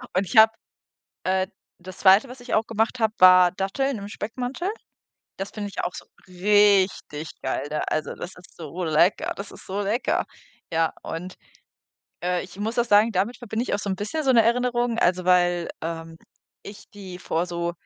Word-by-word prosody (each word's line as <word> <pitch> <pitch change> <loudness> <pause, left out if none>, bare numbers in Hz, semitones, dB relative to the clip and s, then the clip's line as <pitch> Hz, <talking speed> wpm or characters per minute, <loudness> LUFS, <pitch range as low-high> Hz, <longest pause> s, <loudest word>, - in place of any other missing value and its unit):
Und 190 - +2
ich 220 - -3
habe 220 0 +8 0.7
äh, 190 0 +1 0.3
das 180 0 -11
2., 200 +6 +5
was 250 0 -11
ich 245 - -8
auch 220 +1 +2
gemacht 225 +2 -1
habe, 220 -1 +1
war 185 -1 +7
Datteln 220 +7 -2
im 200 - -7
Speckmantel. 250 - -4 0.7
Das 195 +1 -5
finde 205 -1 -5
ich - - -5
auch 175 - -2
so - - -9 0.2
richtig 190 -4 +2
geil 130 +2 -2
da 150 0 -2
also, 155 - -2
das 175 - -7
ist 180 - -17
so 170 +2 -6
lecker 160 +4 +2
das 200 +1 -8
ist - - -14
so 200 +2 -2
lecker. 215 +5 0 0.5
Ja, 165 0 +1
und, 180 +3 -6 0.9
äh, 180 0 0
ich 180 - -14
muss 220 +3 -3
auch 240 - +4
sagen, 215 0 +4
damit 200 +6 -1
verbinde 235 -1 -3
ich - - -2
auch - - 0
so 200 - -3
'n 190 - -1
bisschen 215 +11 -3
so 270 - +3
'ne 230 -2 +6
Erinnerung, 240 0 +1
also, 180 0 +2
weil, 175 -1 +3
ähm, 165 0 -5 0.5
ich 200 0 -12
die 190 -3 -10
vor 175 -1 -2
so 170 -1 -3
195 Hz, 190 wpm, -24 LUFS, 180-225 Hz, 0.9 s, habe